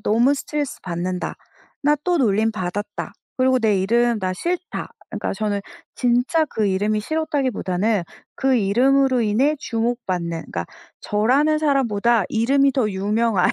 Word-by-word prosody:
"너무 235 Hz, +6 st, +3 dB
스트레스받는다. 185 Hz, -, -4 dB, 0.5 s
나 295 Hz, +1 st, +4 dB
또 355 Hz, -1 st, +1 dB
놀림받았다. 205 Hz, -3 st, -1 dB, 0.2 s
그리고 260 Hz, 0 st, +3 dB
내 210 Hz, -4 st, +2 dB
이름 235 Hz, +3 st, +2 dB
나 185 Hz, -1 st, -1 dB
싫다." 350 Hz, -, -3 dB, 0.2 s
그니까 -, -, -3 dB
저는 205 Hz, 0 st, -1 dB, 0.3 s
진짜 250 Hz, +6 st, +2 dB
그 220 Hz, -6 st, -1 dB
이름이 205 Hz, +2 st, +1 dB
싫었다기보다는 225 Hz, -, -1 dB, 0.3 s
그 265 Hz, -1 st, +2 dB
이름으로 255 Hz, +5 st, +3 dB
인해 235 Hz, +7 st, +2 dB
주목받는 225 Hz, -7 st, -2 dB, 0.2 s
그러니까 85 Hz, -1 st, -3 dB, 0.3 s
저라는 270 Hz, +9 st, +2 dB
사람보다 235 Hz, -7 st, +2 dB
이름이 275 Hz, +5 st, +3 dB
더 245 Hz, -5 st, +1 dB
유명한 205 Hz, +1 st, +1 dB
230 Hz, 320 characters per minute, -22 LUFS, 205-270 Hz, 0.5 s, 나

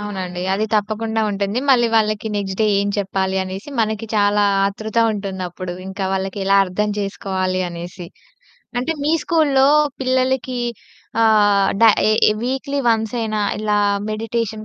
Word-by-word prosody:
అవునండి. 185 Hz, -4 st, -5 dB
అది 215 Hz, +3 st, 0 dB
తప్పకుండా 220 Hz, +1 st, -1 dB
ఉంటుంది. 200 Hz, +3 st, -2 dB
మళ్ళీ 240 Hz, -2 st, +5 dB
వాళ్ళకి 215 Hz, 0 st, +1 dB
నెక్స్ట్ 195 Hz, -1 st, -3 dB
డే 215 Hz, -, +4 dB
ఏం 200 Hz, -, -1 dB
చెప్పాలి? 190 Hz, -1 st, -1 dB
అనేసి 190 Hz, +8 st, -7 dB
మనకి 220 Hz, 0 st, -1 dB
చాలా 205 Hz, 0 st, +3 dB, 0.2 s
ఆతృత 215 Hz, +3 st, -4 dB, 0.2 s
ఉంటుందప్పుడు. 185 Hz, -3 st, -5 dB
ఇంకా 190 Hz, +1 st, -4 dB
వాళ్ళకి 190 Hz, +1 st, -3 dB
ఎలా 195 Hz, +1 st, +4 dB
అర్థం 200 Hz, +3 st, -2 dB
చేసుకోవాలి? 190 Hz, -2 st, -2 dB
అనేసి. 175 Hz, +1 st, -8 dB, 0.7 s
అంటే 305 Hz, +7 st, -1 dB
మీ 305 Hz, -, +2 dB
స్కూలులో 285 Hz, -5 st, +3 dB, 0.3 s
పిల్లలకి 255 Hz, -1 st, 0 dB, 0.6 s
ఆహ్, 205 Hz, -3 st, +4 dB
డ -, -, +2 dB, 0.3 s
ఎ 215 Hz, 0 st, +4 dB
వీక్లీ 270 Hz, +2 st, -2 dB
వన్సయినా 220 Hz, -1 st, 0 dB, 0.2 s
ఇలా 210 Hz, -1 st, 0 dB, 0.3 s
మెడిటేషన్ 220 Hz, 0 st, -3 dB
210 Hz, 130 wpm, -19 LUFS, 195-225 Hz, 0.7 s, మళ్ళీ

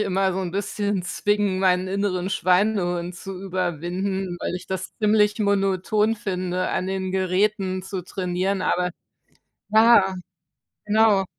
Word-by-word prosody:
immer 195 Hz, -2 st, +1 dB
so 190 Hz, -, -1 dB
'n 180 Hz, -2 st, -3 dB
bisschen 200 Hz, 0 st, -2 dB
zwingen, 205 Hz, +1 st, 0 dB
meinen 185 Hz, 0 st, +2 dB
inneren 190 Hz, -2 st, -1 dB
Schweinehund 180 Hz, -2 st, +1 dB
zu 190 Hz, 0 st, -8 dB
überwinden, 185 Hz, +1 st, -2 dB
weil -, -, -3 dB
ich 180 Hz, 0 st, -7 dB
das 190 Hz, 0 st, -5 dB
ziemlich 210 Hz, 0 st, +3 dB
monoton 200 Hz, +1 st, +1 dB
finde, 185 Hz, -3 st, -2 dB
an 185 Hz, -, -1 dB
den 190 Hz, -1 st, -2 dB
Geräten 190 Hz, 0 st, 0 dB
zu 190 Hz, -1 st, -5 dB
trainieren, 185 Hz, +2 st, -2 dB
aber 180 Hz, -1 st, 0 dB, 0.8 s
ja, 215 Hz, -3 st, +6 dB, 0.7 s
genau. 210 Hz, -2 st, +4 dB
190 Hz, 125 wpm, -23 LUFS, 185-205 Hz, 0.8 s, ja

